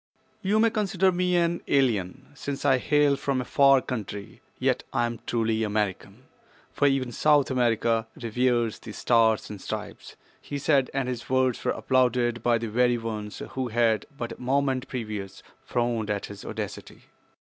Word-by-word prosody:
"You 205 +3 +2
may 225 0 +4
consider 195 -3 +2
me 180 0 +1
an 170 0 +1
alien, 125 -2 0
since 145 -1 -5
I 135 -2 +4
hail 145 +1 +3
from 140 -1 -1
a 125 - -3
far 140 -1 +5
country, 105 -5 -6 0.2
yet - - +1
I 120 - +1
am 120 -1 -4
truly 115 -1 0
American—for 105 +6 -3
even 135 -3 0
South 145 +2 +3
America 115 -2 +1
reveres 120 -1 0
the 110 - -9
Stars 115 -2 +2
and 100 -3 -8
Stripes," - - -6 0.3
he 145 - -5
said, 140 -2 +2
and 135 -2 -1
his 125 -2 -5
words 130 -1 +1
were - - 0
applauded 125 -2 +1
by 120 0 +3
the 115 0 -4
very 120 +2 +2
ones 110 -2 -5
who 130 -1 -2
had 115 -1 +1
but 120 -1 -4
a - - -9
moment 135 0 0
previous 105 -6 -6 0.2
frowned 120 -3 -1
at 100 -1 -1
his 100 -1 -10
audacity. - - -7
125 Hz, 160 wpm, -26 LUFS, 115-135 Hz, 0.3 s, far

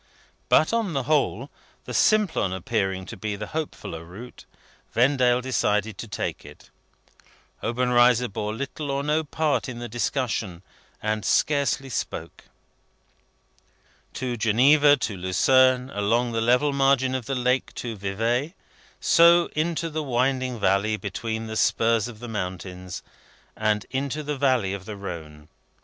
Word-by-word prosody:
But, 155 - +4
on 225 -6 0
the 135 - -1
whole, 140 -3 0 0.3
the - - -6
Simplon 210 - +2
appearing 95 -1 -2
to - - -8
be 105 +1 -4
the 105 +1 -5
hopefuller 150 - -5
route, 100 +9 -11 0.5
Vendale 125 0 +3
decided 110 -5 0
to 115 - -6
take 105 - -4
it. - - -15 0.9
Obenreizer 125 0 +3
bore 105 0 -4
little 140 +5 -5
or 140 0 -1
no 150 +2 +1
part 150 -2 -1
in 120 - -6
the 120 0 -5
discussion, 110 -5 -2 0.4
and 110 0 -1
scarcely 140 -2 +1
spoke. 120 - -5 1.7
To 125 -2 -3
Geneva, 140 +7 +5
to 110 -5 -3
Lausanne, 130 +8 +3
along 115 +4 0
the 115 0 -1
level 125 +5 +3
margin 135 -1 +2
of 130 -3 -3
the 135 - -1
lake 125 +1 0
to 115 -2 -5
Vevay, 115 - -1 0.4
so 170 +1 +5
into 165 +2 -1
the 155 -1 -3
winding 130 -2 0
valley 100 +2 +2
between 110 +3 -4
the 110 0 -6
spurs 115 +1 +2
of 120 -3 -9
the 120 - -7
mountains, 90 -3 -5 0.5
and 105 -1 0
into 140 +3 -2
the 150 0 -3
valley 130 -8 +1
of 100 -1 -7
the 105 -1 -6
Rhone. 80 -6 -8
120 Hz, 140 wpm, -25 LUFS, 105-135 Hz, 1.7 s, Geneva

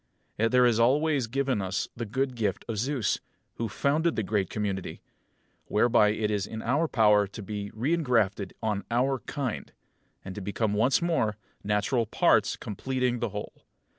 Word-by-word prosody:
Yet 115 +1 +2
there 125 0 +5
is 120 -2 +3
always 140 +2 +3
given 135 -2 0
us 95 +1 -2
the 120 -1 -4
good 130 +4 -1
gift 105 -5 -2
of 110 -3 -3
Zeus, 130 -1 0 0.4
who 115 -1 -2
founded 155 - +1
the 110 - 0
great 100 -2 0
community, 100 -3 -3 0.7
whereby 105 -1 +4
it 105 0 0
is 105 -1 -1
in 110 - -6
our 140 +7 +1
power 105 -6 +4
to 105 +2 -9
be 100 0 -5
reingrafted 115 - 0
on 105 -2 -1
our 130 +3 +1
kind, 135 -5 -4 0.5
and 95 - -6
to 105 - -6
become 105 +2 -1
once 120 +10 +2
more, 125 - +1 0.3
natural 105 +3 +1
parts - - +3
completing 125 +3 -2
the 120 - -1
whole. 105 +1 -8
115 Hz, 165 wpm, -28 LUFS, 105-130 Hz, 0.7 s, there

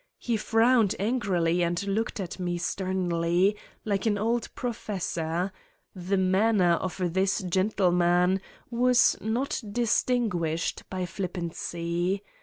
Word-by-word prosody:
He 235 - -1
frowned 225 0 +3
angrily 185 -6 +1
and 175 +2 -1
looked 210 +3 -1
at 185 -1 -5
me 175 -1 -1
sternly, 180 +1 0 0.3
like 205 0 0
an 205 -2 +2
old 230 +3 0
pro 245 -1 -2
fessor... 175 -3 -3 0.4
the 185 +2 -1
manner 190 0 +3
of 180 0 -1
this 190 +2 +1
gentleman 180 -1 +2 0.3
was 245 +1 +4
not 235 +7 -1
distinguished 215 -8 0
by 185 -1 -3
flippancy. 175 0 -3
190 Hz, 110 wpm, -27 LUFS, 175-215 Hz, 0.4 s, was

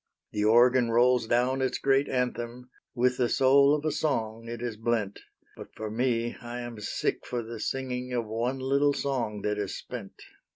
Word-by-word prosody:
The 105 - -1
organ 120 +2 +5
rolls 120 0 +3
down 125 +3 +1
its 130 - 0
great 135 +1 +2
anthem, 125 -1 -3 0.2
With 125 0 +2
the 125 -2 +1
soul 140 +2 +5
of 150 0 -4
a 155 - +1
song 115 -7 -2
it 120 0 -5
is 120 -2 -4
blent, 110 -2 -1 0.4
But - - -12
for 110 -1 -5
me, 120 0 0
I 120 +1 -6
am 120 -2 -7
sick 105 - -2
for 120 -1 -3
the 115 0 -7
singing 125 +1 -3
Of 120 -2 -1
one 115 +4 -2
little 140 +2 +2
song 120 -8 -2
that 105 0 -1
is 100 -2 -3
spent. - - -9
120 Hz, 180 wpm, -28 LUFS, 115-130 Hz, 0.4 s, organ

